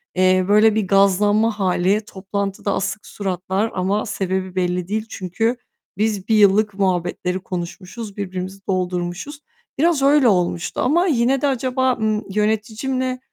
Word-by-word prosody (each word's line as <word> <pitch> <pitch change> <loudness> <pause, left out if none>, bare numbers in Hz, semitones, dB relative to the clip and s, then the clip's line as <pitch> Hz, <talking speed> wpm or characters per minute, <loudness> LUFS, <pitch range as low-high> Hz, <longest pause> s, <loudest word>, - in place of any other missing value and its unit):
Eee, 185 0 +3
böyle 210 +1 +5
bir 215 -4 0
gazlanma 205 +3 +3
hâli, 190 +2 +2
toplantıda 200 0 -3
asık 205 +1 -3
suratlar 190 +2 -2
ama 195 +4 0
sebebi 190 -3 -3
belli 180 -1 -1
değil. 215 +2 -2
Çünkü 225 +6 -2 0.4
biz 210 -2 -1
1 220 - +3
yıllık 210 +1 +4
muhabbetleri 180 -1 -1
konuşmuşuz, 190 +4 -7
birbirimizi 190 0 -5
doldurmuşuz. 180 +8 -3 0.4
Biraz 325 -1 +2
öyle 275 -2 +5
olmuştu 180 -4 0
ama 340 +8 +2
yine 260 -3 +2
de 290 - +2
acaba, 260 -1 +1
ımm, 215 -2 -1
yöneticimle 225 +5 -1
205 Hz, 130 wpm, -20 LUFS, 185-225 Hz, 0.4 s, böyle